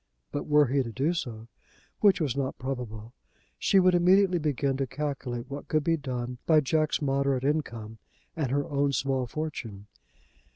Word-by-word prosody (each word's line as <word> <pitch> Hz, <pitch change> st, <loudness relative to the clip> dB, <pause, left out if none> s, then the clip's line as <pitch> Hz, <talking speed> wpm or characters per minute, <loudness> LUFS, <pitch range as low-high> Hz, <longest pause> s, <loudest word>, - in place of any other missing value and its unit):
But 145 Hz, -, -4 dB
were 150 Hz, -1 st, +5 dB
he 135 Hz, +2 st, +1 dB
to 120 Hz, -3 st, -4 dB
do 140 Hz, +9 st, 0 dB
so, 115 Hz, -9 st, -5 dB, 0.5 s
which 200 Hz, -3 st, +5 dB
was 145 Hz, -6 st, 0 dB
not 135 Hz, -1 st, -2 dB
probable, 120 Hz, -4 st, -5 dB, 0.5 s
she 195 Hz, -, +4 dB
would 185 Hz, -1 st, +5 dB
immediately 180 Hz, +1 st, +4 dB
begin 140 Hz, -3 st, 0 dB
to 135 Hz, -1 st, -1 dB
calculate 135 Hz, -4 st, -4 dB
what 140 Hz, +1 st, -7 dB
could 155 Hz, -1 st, +1 dB
be 165 Hz, +2 st, +2 dB
done 125 Hz, -4 st, -4 dB
by 160 Hz, -2 st, +6 dB
Jack's 155 Hz, +1 st, 0 dB
moderate 135 Hz, -1 st, +1 dB
income 115 Hz, -7 st, -2 dB, 0.4 s
and 150 Hz, -6 st, -1 dB
her 140 Hz, +2 st, 0 dB
own 140 Hz, 0 st, 0 dB
small 135 Hz, -2 st, 0 dB
fortune. 115 Hz, -10 st, -5 dB
140 Hz, 165 wpm, -28 LUFS, 125-155 Hz, 0.5 s, by